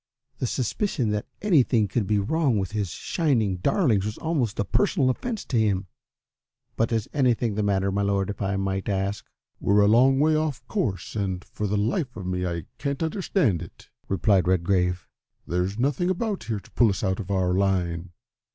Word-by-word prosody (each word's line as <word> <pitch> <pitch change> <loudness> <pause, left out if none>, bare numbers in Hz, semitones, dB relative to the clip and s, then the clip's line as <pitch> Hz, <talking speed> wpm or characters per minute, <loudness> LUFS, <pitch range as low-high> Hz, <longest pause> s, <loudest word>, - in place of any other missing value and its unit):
The 125 - 0
suspicion 130 - -1
that 105 0 -2 0.2
anything 130 - +3
could 100 0 -1
be 105 - +2
wrong 135 +4 +1
with 95 -2 -2
his 105 -4 -2
shining 115 - 0
darlings 115 - +2
was 105 +1 -4
almost 145 -10 -1
a 105 - +1
personal 145 - +2
offence 225 - -4
to 120 - 0
him. 100 -3 +1 0.9
"But 115 +1 0
is 115 -3 0
anything 125 -5 +2
the 105 - -1
matter, 100 -1 +1
my 100 +1 0
Lord, 100 0 0
if 100 - -9
I 100 0 0
might 95 0 -2
ask?" 100 +1 -1 0.4
"We're 100 +1 +3
a 100 - +5
long 130 +5 +5
way 155 +1 +4
off 155 -3 -1
our - - -14
course, 110 - -2
and 95 -3 -2
for 105 - -4
the 105 +1 0
life 125 - -1
of 95 - -6
me 90 0 -1
I 85 -2 -4
can't 140 +1 -2
understand 160 - 0
it," 85 - -12 0.2
replied 95 -1 +2
Redgrave. 90 0 +1 0.4
"There's 90 +3 -1
nothing 140 +8 +1
about 200 +2 -2
here 110 -3 -2
to 95 - -19
pull 120 - +4
us 95 - -2
out 95 -2 0
of 100 - -6
our 95 -2 +1
line. 90 -3 0
105 Hz, 190 wpm, -25 LUFS, 95-135 Hz, 0.9 s, a